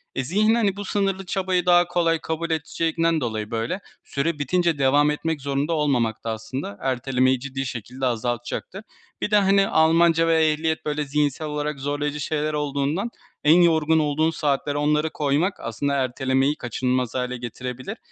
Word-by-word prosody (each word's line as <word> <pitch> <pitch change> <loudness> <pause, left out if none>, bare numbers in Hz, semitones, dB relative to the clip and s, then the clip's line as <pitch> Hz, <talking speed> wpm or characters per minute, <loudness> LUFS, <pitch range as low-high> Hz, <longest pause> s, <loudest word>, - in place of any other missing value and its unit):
Eee, 130 - -1
zihin, 215 - +2
hani, 205 -5 +1
bu 205 0 -6
sınırlı 195 -1 -1
çabayı 185 -1 0
daha 175 -1 +5
kolay 165 -2 +1
kabul 160 +1 -3
edeceğinden 165 +1 0
dolayı, 110 -4 -3
böyle, 115 - -2 0.2
süre 150 +2 -2
bitince 170 +2 +1
devam 145 +2 +3
etmek 160 0 -2
zorunda 140 +4 -1
olmamak 130 -8 0
da 115 - -2
aslında 110 -1 -5
ertelemeyi 130 0 +1
ciddi 135 +1 -4
şekilde 125 +2 -5
azaltacaktır. 120 - -3 0.4
Bir - - -2
de, - - +4
hani, 195 0 +4
Almanca 165 +1 +4
ve 160 -1 +4
ehliyet, 160 +1 -1
böyle, 150 0 -1
zihinsel 145 +1 -1
olarak 150 -1 -3
zorlayıcı 145 +1 -2
şeyler 150 +1 -1
olduğundan 150 +7 -1 0.3
en 160 +4 +6
yorgun 160 -1 +3
olduğun 155 +2 +1
saatler 145 -2 -1
onları 150 +1 +1
koymak 150 +6 0
aslında 140 +5 -2
ertelemeyi 135 +1 +1
kaçınılmaz 125 0 -2
hâle 125 -1 -2
getirebilir. 125 - -6
150 Hz, 155 wpm, -23 LUFS, 130-165 Hz, 0.4 s, en